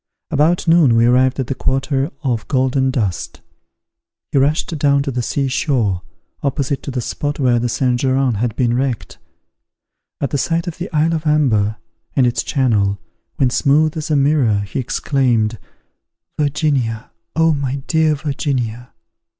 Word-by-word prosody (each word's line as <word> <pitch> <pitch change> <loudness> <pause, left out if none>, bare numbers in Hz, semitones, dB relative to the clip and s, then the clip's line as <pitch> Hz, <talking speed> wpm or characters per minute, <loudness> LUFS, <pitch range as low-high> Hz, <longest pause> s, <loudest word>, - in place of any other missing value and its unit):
About 160 +4 +2
noon 165 -8 +5
we 115 +1 +4
arrived 130 +2 +3
at 130 - 0
the 135 - -2
quarter 135 +2 -1
of 120 -6 -1
Golden 130 0 +1
Dust. 105 -9 -3 0.9
He 140 - +3
rushed 150 +4 +1
down 140 -1 +3
to 140 - -3
the 125 -1 -2
sea 135 +3 -1
shore, 120 - 0 0.4
opposite 140 0 -1
to - - -7
the 125 -2 -2
spot 145 +5 -3
where 125 -3 +3
the 120 +1 -1
Saint 125 +1 0
Geran 130 -1 +1
had 115 0 -1
been 120 -2 +1
wrecked. 125 -1 -2 1.0
At 140 - -2
the 145 - 0
sight 165 +3 0
of 175 +1 -6
the 180 - -5
isle 160 +2 +2
of 160 -1 -2
Amber, 115 -9 +2 0.4
and 130 - +4
its 120 - +1
channel, 105 -8 +1 0.4
when 130 -2 +1
smooth 150 +4 +2
as 155 -1 -4
a 155 - +2
mirror, 135 -7 +2
he 100 +6 -4
exclaimed, 120 -4 0 0.8
"Virginia! 140 -6 -1 0.2
oh 165 0 +3
my 140 -1 -3
dear 160 -2 +2
Virginia!" 130 -5 -3
135 Hz, 160 wpm, -18 LUFS, 120-150 Hz, 1.0 s, noon